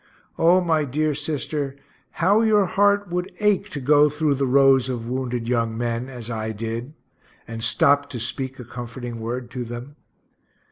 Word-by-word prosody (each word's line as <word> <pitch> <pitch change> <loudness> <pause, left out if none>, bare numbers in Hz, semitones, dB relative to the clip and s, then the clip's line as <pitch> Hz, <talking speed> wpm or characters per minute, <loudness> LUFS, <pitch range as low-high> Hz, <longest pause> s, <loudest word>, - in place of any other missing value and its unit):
O 175 +3 +5
my 160 -3 +1
dear 150 +3 0
sister, 145 -1 -3 0.4
how 200 +6 +3
your 215 -3 +4
heart 205 +1 +2
would 180 +2 -2
ache 210 -2 +2
to 145 - -5
go 145 +2 +5
through 150 0 0
the 135 0 0
rows 135 -1 +4
of 120 -3 -4
wounded 125 -2 -3
young 115 -2 0
men, 120 +1 -2
as 120 -4 -8
I 110 -1 -3
did 115 +6 -5 0.5
and 115 -1 -6
stopt 140 +5 +3
to 120 - -4
speak 130 +3 -3
a 125 - -9
comforting 120 0 -7
word 120 +2 -5
to 125 +1 -4
them. 120 +5 -8
135 Hz, 170 wpm, -23 LUFS, 120-155 Hz, 0.5 s, O